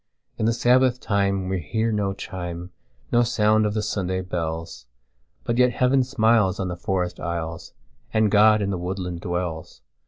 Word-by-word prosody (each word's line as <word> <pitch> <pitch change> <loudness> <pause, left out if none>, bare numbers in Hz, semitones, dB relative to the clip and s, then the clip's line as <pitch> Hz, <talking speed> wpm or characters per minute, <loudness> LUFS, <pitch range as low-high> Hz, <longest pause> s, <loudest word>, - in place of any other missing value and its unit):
In 110 - +1
the - - +4
Sabbath 125 +1 +3
time 100 -4 0
we 95 0 -1
hear 110 +8 -1
no 105 -2 0
chime, 90 -2 -6 0.4
No 120 - +4
sound 110 -2 +2
of 105 - -3
the 105 - 0
Sunday 95 -3 -2
bells; 85 -6 -5 0.6
But 120 +1 -1
yet 125 -1 +4
Heaven 130 +2 +3
smiles 110 -6 +2
on 95 -2 -2
the 90 - -4
forest 90 0 -2
aisles, 85 -1 -5 0.4
And 110 -2 +2
God 105 0 +5
in 100 - -1
the 95 - -2
woodland 90 -1 -4
dwells. 85 -3 -4
100 Hz, 165 wpm, -24 LUFS, 90-110 Hz, 0.6 s, God